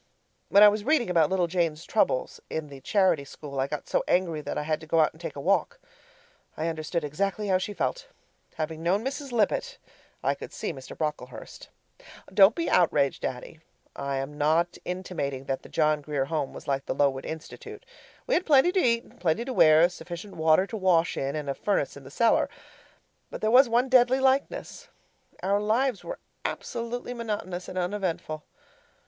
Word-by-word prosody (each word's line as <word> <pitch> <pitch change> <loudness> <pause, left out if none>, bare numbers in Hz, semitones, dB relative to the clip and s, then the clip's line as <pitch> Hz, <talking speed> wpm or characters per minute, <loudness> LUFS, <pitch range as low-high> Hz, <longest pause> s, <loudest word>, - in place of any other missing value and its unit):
When 200 +1 +7
I - - +11
was 210 0 +2
reading 255 -7 +2
about 165 -4 +4
little 185 -2 +2
Jane's 170 -2 -1
troubles - - 0
in 160 -2 -4
the 140 -1 -11
charity 185 -2 +2
school, 140 0 -8
I 135 - +1
got 150 +1 -5
so - - +1
angry 170 -4 +1
that - - -5
I - - -1
had 155 +1 -1
to 160 - -11
go 165 +1 +2
out 155 - +3
and 160 - -17
take 155 - -6
a - - -6
walk. 200 - +1 0.8
I 160 - -1
understood 160 +1 -3
exactly 195 +7 -2
how 185 -1 +3
she 195 - -4
felt. - - -2 0.5
Having 160 0 -4
known 190 +7 +1
Mrs. 275 0 -4
Lippett, 220 -4 0 0.5
I - - +2
could - - -9
see 210 - -4
Mr. 135 -2 -10
Brocklehurst. 150 -5 -5 0.6
Don't 195 +2 +7
be 335 - -2
outraged, 145 -6 +2
Daddy. 130 +5 -5 0.4
I 140 0 -3
am 140 +3 -5
not 160 +4 +2
intimating 170 -7 -4
that 135 -1 -3
the - - -14
John 155 -1 +2
Grier 145 -2 -2
Home 145 -2 -2
was - - -11
like 135 -1 -1
the - - -2
Lowood 135 -1 +1
Institute. 415 - -8 0.4
We - - -1
had 365 - +2
plenty 295 +2 +5
to 380 - +1
eat 235 -7 +2
and - - -21
plenty 175 +7 +1
to 260 - -4
wear, 160 -4 +6
sufficient 175 +2 -9
water 160 +3 +4
to 220 - -6
wash 180 -4 +2
in, 135 +2 -2
and 150 -2 -4
a 140 - 0
furnace 195 -3 -1
in 140 - -11
the - - -10
cellar. 230 +10 +2 0.8
But - - -7
there 215 - +1
was 255 +1 +7
one 240 +3 +2
deadly 255 0 +5
likeness. 270 - 0 0.6
Our 200 +2 +2
lives 230 +2 +1
were - - -6 0.3
absolutely 240 +1 -4
monotonous 205 -6 -4
and 185 - -7
uneventful. 175 -5 -2
175 Hz, 190 wpm, -27 LUFS, 150-225 Hz, 0.8 s, I